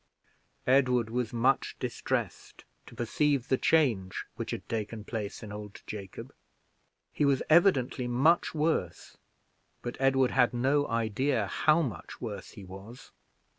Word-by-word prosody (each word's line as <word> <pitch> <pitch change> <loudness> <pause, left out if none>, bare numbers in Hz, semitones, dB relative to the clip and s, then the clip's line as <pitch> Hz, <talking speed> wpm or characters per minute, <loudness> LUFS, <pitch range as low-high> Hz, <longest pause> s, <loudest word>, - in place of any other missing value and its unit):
Edward 125 -3 +3
was 125 -1 -1
much 125 +3 +1
distressed - - -4 0.2
to - - -13
perceive 135 +2 0
the 130 - +3
change 115 -13 +1
which - - -5
had - - -5
taken 110 -1 -4
place 105 -1 -5
in 105 - -8
old 105 -1 -9
Jacob. 100 -3 -8 0.8
He - - 0
was 140 -2 +3
evidently 140 -8 +4
much 140 +9 +2
worse; 150 - -1 0.7
but 120 - -5
Edward 135 -1 +3
had 125 -2 +3
no 140 +4 +2
idea 115 +1 0
how 155 - +2
much 110 - -6
worse - - -6
he 100 - -10
was. 95 +6 -11
125 Hz, 135 wpm, -29 LUFS, 110-140 Hz, 0.8 s, evidently